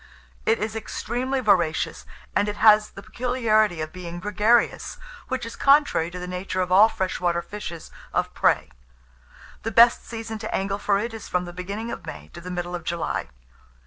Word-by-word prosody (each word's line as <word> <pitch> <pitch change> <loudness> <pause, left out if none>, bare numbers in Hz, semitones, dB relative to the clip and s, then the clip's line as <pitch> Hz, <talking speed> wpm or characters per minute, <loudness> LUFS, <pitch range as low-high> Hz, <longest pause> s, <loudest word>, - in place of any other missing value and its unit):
It 225 +1 +4
is 215 +1 -3
extremely 255 +4 -2
voracious, 180 -8 +1 0.3
and 205 - +2
it 205 - -3
has 210 0 +6
the 200 - -11
peculiarity 220 -8 +1
of 155 0 -5
being 175 -1 -7
gregarious, 210 +4 +1 0.3
which 260 -3 -3
is 230 - -7
contrary 275 - +4
to 180 - -8
the 180 - -5
nature 180 +1 -4
of 180 -1 -1
all 205 +4 +7
fresh 190 -3 -2
water 170 -1 0
fishes 175 -5 -8 0.2
of - - -1
prey. - - +2 0.9
The 225 - -2
best 235 +2 +6
season 225 -1 -6
to 220 - -3
angle 195 +1 -1
for 200 -1 +2
it 230 +3 -3
is 225 - -8
from 180 0 0
the 175 - -8
beginning 200 +6 -5
of - - -7
May 75 -1 -8
to 170 - -11
the 180 - -8
middle 175 0 -4
of 175 -2 -4
July. 170 0 -2
205 Hz, 185 wpm, -24 LUFS, 180-225 Hz, 0.9 s, all